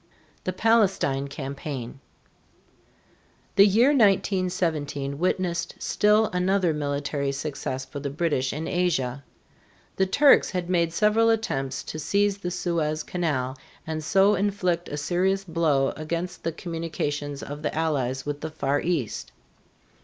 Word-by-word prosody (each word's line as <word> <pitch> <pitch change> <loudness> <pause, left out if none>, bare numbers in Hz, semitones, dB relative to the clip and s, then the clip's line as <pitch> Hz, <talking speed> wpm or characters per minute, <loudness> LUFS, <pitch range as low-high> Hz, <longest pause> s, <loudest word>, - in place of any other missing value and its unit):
THE 185 - 0
PALESTINE 195 -11 +2
CAMPAIGN. 135 -2 -6 1.6
The 200 +1 +8
year 225 +7 +5
1917 180 - +1
witnessed 180 -1 -1
still 210 +1 +3
another 180 -1 +2
military 145 -1 -2
success 135 -2 -4
for 135 +2 -7
the 140 0 -3
British 140 -3 0
in 155 +3 -4
Asia. 140 -8 0 0.7
The 190 - +2
Turks 280 +8 +5
had 180 -1 -3
made 170 -2 +2
several 215 +5 +3
attempts 135 -12 -1
to 155 - -6
seize 200 +4 +1
the 180 - -3
Suez 165 -3 -1
Canal 145 -8 -2 0.3
and 155 -1 -4
so 195 +6 +4
inflict 190 -3 0
a 145 - -4
serious 185 +5 0
blow 160 -6 +1
against 170 +3 -4
the 165 - -1
communications 155 -4 -4
of 145 +1 -7
the 150 - -2
Allies 140 -5 -1
with 145 0 -4
the 160 - -3
Far 145 -2 -1
East. 160 -10 -2
165 Hz, 130 wpm, -25 LUFS, 145-185 Hz, 1.6 s, The